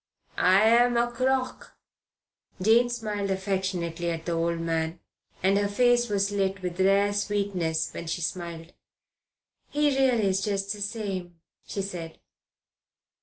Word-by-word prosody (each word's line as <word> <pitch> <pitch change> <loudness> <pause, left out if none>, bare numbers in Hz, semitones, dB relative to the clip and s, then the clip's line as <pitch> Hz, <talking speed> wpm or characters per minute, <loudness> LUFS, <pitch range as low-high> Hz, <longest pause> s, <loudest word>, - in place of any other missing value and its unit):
I'm 230 +6 +5
a 240 0 +1
crock." 255 +1 -2 0.8
Jane 225 +5 +4
smiled 210 -4 -3
affectionately 190 -3 -2
at 165 -1 -4
the 175 - -2
old 170 0 0
man, 165 0 -2 0.4
and 195 +1 +4
her 205 - +1
face 240 +3 +3
was 200 0 +1
lit 195 -1 -1
with 180 0 -4
rare 200 +2 +3
sweetness 200 -6 -1
when 170 - -7
she 165 - -2
smiled. 170 0 -5 1.0
"He 295 0 +2
really 255 -5 +3
is 190 0 +1
just 200 -1 -1
the 205 - -9
same," 195 -5 -4 0.3
she 200 - -3
said. 170 -4 -6
195 Hz, 130 wpm, -27 LUFS, 175-220 Hz, 1.0 s, I'm